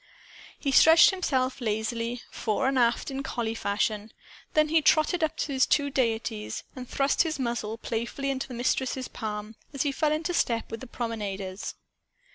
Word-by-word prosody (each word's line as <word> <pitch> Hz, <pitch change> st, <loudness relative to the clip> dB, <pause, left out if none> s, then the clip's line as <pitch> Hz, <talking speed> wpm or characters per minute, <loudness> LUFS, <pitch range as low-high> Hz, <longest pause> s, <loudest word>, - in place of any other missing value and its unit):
He 280 Hz, -, -1 dB
stretched 325 Hz, +4 st, +8 dB
himself 270 Hz, -9 st, -1 dB
lazily, 230 Hz, +2 st, -2 dB
fore 235 Hz, +4 st, -1 dB
and 270 Hz, -1 st, +2 dB
aft, 235 Hz, +3 st, +2 dB
in 270 Hz, 0 st, -3 dB
collie 235 Hz, -4 st, -2 dB
fashion. 210 Hz, 0 st, -1 dB, 0.4 s
Then 305 Hz, 0 st, +4 dB
he 320 Hz, 0 st, +4 dB
trotted 310 Hz, +3 st, +3 dB
up 315 Hz, -, 0 dB
to 290 Hz, -, -2 dB
his 260 Hz, -1 st, +3 dB
two 285 Hz, -1 st, +2 dB
deities 225 Hz, -4 st, -1 dB
and 255 Hz, -2 st, -8 dB
thrust 275 Hz, 0 st, +2 dB
his 325 Hz, -2 st, 0 dB
muzzle 235 Hz, -4 st, -2 dB
playfully 235 Hz, +5 st, -3 dB
into 265 Hz, -1 st, -3 dB
the 255 Hz, -, -7 dB
Mistress's 255 Hz, +1 st, -1 dB
palm, 210 Hz, -1 st, -5 dB, 0.2 s
as 275 Hz, -, +1 dB
he 285 Hz, -, 0 dB
fell 300 Hz, +2 st, +1 dB
into 325 Hz, +3 st, -1 dB
step 230 Hz, -9 st, 0 dB
with 225 Hz, -, -5 dB
the 260 Hz, -, -9 dB
promenaders. 205 Hz, -5 st, -4 dB
250 Hz, 170 wpm, -27 LUFS, 225-280 Hz, 0.4 s, stretched